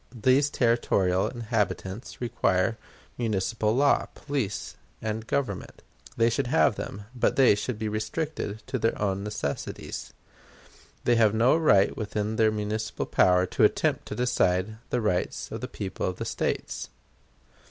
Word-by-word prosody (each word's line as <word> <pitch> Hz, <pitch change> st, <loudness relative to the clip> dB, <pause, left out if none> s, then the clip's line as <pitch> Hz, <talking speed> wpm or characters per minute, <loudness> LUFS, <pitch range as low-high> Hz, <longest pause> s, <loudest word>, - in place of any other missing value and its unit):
These 135 Hz, +3 st, +4 dB
territorial 100 Hz, -8 st, +2 dB
inhabitants 110 Hz, -2 st, -3 dB
require 110 Hz, -3 st, +1 dB, 0.4 s
municipal 110 Hz, 0 st, 0 dB
law, 140 Hz, +2 st, +3 dB
police, 135 Hz, -9 st, -3 dB, 0.2 s
and 110 Hz, +1 st, -4 dB
government. 125 Hz, -9 st, -3 dB, 0.3 s
They 115 Hz, 0 st, +4 dB
should 125 Hz, +3 st, 0 dB
have 135 Hz, -2 st, +4 dB
them, 100 Hz, 0 st, -6 dB
but 125 Hz, -1 st, +1 dB
they 135 Hz, -4 st, +6 dB
should 105 Hz, +3 st, -3 dB
be 110 Hz, 0 st, -3 dB
restricted 110 Hz, 0 st, -3 dB
to -, -, -3 dB
their 115 Hz, -, 0 dB
own 100 Hz, -1 st, -1 dB
necessities. 105 Hz, -9 st, -4 dB, 0.9 s
They 120 Hz, -1 st, +3 dB
have 110 Hz, -2 st, +4 dB
no 120 Hz, +6 st, +4 dB
right 105 Hz, -12 st, +4 dB
within 105 Hz, 0 st, -2 dB
their 110 Hz, -1 st, +4 dB
municipal 110 Hz, +1 st, -3 dB
power 90 Hz, 0 st, +4 dB
to -, -, 0 dB
attempt -, -, +2 dB
to -, -, -5 dB
decide 110 Hz, -4 st, +1 dB
the 125 Hz, -, 0 dB
rights 90 Hz, -5 st, -1 dB
of -, -, -5 dB
the -, -, -3 dB
people 95 Hz, -, -4 dB
of 90 Hz, -, -2 dB
the -, -, -5 dB
States. -, -, -2 dB
110 Hz, 140 wpm, -27 LUFS, 100-120 Hz, 0.9 s, they